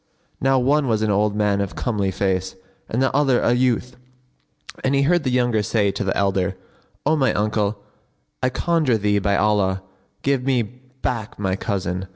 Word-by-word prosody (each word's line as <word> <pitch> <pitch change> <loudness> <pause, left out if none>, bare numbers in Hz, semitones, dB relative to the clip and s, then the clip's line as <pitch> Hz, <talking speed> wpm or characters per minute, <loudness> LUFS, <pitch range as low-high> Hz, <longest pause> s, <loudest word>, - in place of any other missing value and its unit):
Now 135 0 +3
one 140 +3 +2
was 110 -2 +1
an 110 - +1
old 105 +1 +1
man 105 -1 +1
of 100 - -4
comely 105 -6 -1
face 95 -1 -1 0.3
and 120 +4 0
the 130 - 0
other 135 -4 +3
a 120 - +2
youth; 125 0 0 0.9
and 135 +1 +2
he 140 - +3
heard 175 +3 +2
the 130 - 0
younger 120 -3 +2
say 105 -1 +1
to 100 - -3
the 95 - -1
elder, 95 -1 0 0.5
"O 155 +2 +3
my 135 -4 +2
uncle,, 105 0 0 0.6
I 130 - +2
conjure 150 -2 +1
thee 105 -1 +1
by 100 0 +1
Allah, 95 -3 +1 0.4
give 135 -2 +1
me 130 -2 +1
back 125 -1 -6
my 95 -2 -1
cousin!" 95 -2 -3
110 Hz, 180 wpm, -22 LUFS, 100-130 Hz, 0.9 s, Now